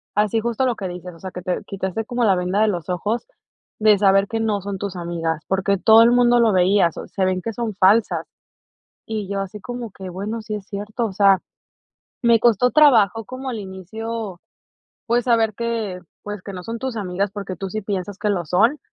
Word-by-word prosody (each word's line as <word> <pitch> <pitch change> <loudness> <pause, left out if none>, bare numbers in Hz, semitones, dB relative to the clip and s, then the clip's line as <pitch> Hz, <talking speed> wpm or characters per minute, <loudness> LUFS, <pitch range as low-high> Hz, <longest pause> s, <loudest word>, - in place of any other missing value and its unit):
así 210 +2 +2
justo 235 +3 -1
lo 250 -2 +1
que 190 - -4
dices, 180 0 -8
o 165 - -16
sea, 185 +1 -7
que 180 - -7
te 180 0 -2
quitaste 195 +2 -3
como 245 +1 -1
la 195 -4 +4
venda 180 +3 0
de 220 - +4
los 175 -5 -4
ojos 205 - -2 0.5
de 215 -1 +5
saber 195 0 +4
que 225 - -3
no 215 -3 0
son 200 0 -4
tus 195 -1 -5
amigas, 165 -2 -3
porque, 195 +1 +1
todo 220 +4 +7
el 235 - +5
mundo 245 0 +4
lo 230 -2 +4
veía, 185 0 +4
se 190 +4 -3
ven 185 0 0
que 225 +4 -4
son 225 -2 -3
falsas. 205 +4 +3 0.8
Y 215 -3 -3
yo 200 -1 -2
así 195 +2 -5
como 245 -3 -6
que, 190 -1 -9
bueno, 205 +5 -4
sí 215 0 -6
es 205 -1 -8
cierto, 210 +4 -3
o 200 - -7
sea, 195 -1 +5 0.8
me 235 -1 +5
costó 240 +1 +4
trabajo 225 -8 +5
como 260 +4 -6
al 235 - -3
inicio, 200 +1 -6 0.7
pues, 240 0 +1
saber 225 -3 +2
que, 225 -5 -3 0.2
pues, 205 -2 -6
que 200 - -8
no 180 - -7
son 230 +4 -5
tus 255 0 -4
amigas 195 -1 -2
porque, 195 -3 -6
tú 195 - -5
sí 215 +3 -4
piensas 195 -1 -4
que 210 0 0
lo 180 -4 -1
son, 225 - +3
205 Hz, 210 wpm, -21 LUFS, 190-230 Hz, 0.8 s, todo